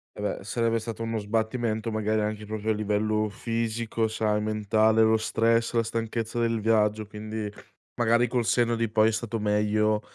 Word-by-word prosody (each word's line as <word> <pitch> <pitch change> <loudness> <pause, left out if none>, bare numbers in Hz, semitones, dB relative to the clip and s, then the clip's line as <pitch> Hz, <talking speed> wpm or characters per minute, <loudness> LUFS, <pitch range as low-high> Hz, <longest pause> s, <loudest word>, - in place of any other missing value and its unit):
Eh, - - -7
beh, - - -3
sarebbe 115 -1 0
stato 115 0 -5
uno 115 0 -2
sbattimento, 110 +1 -1
magari, 110 0 0
anche 105 0 -3
proprio 110 +1 -2
a - - +3
livello 105 0 0
fisico, 115 +1 -2
sai, 110 -1 0
mentale, 110 +1 +2
lo 110 0 +4
stress, 115 +1 +1
la 115 -1 +2
stanchezza 115 0 -3
del 115 -1 +1
viaggio, 110 -1 +2
quindi, 105 +1 -5 0.5
magari, 120 +1 +3
col 125 0 0
senno 120 0 +2
di 115 -1 -1
poi, 110 0 +4
è - - 0
stato 115 +1 -3
meglio, 105 0 +1
110 Hz, 170 wpm, -26 LUFS, 105-115 Hz, 0.5 s, lo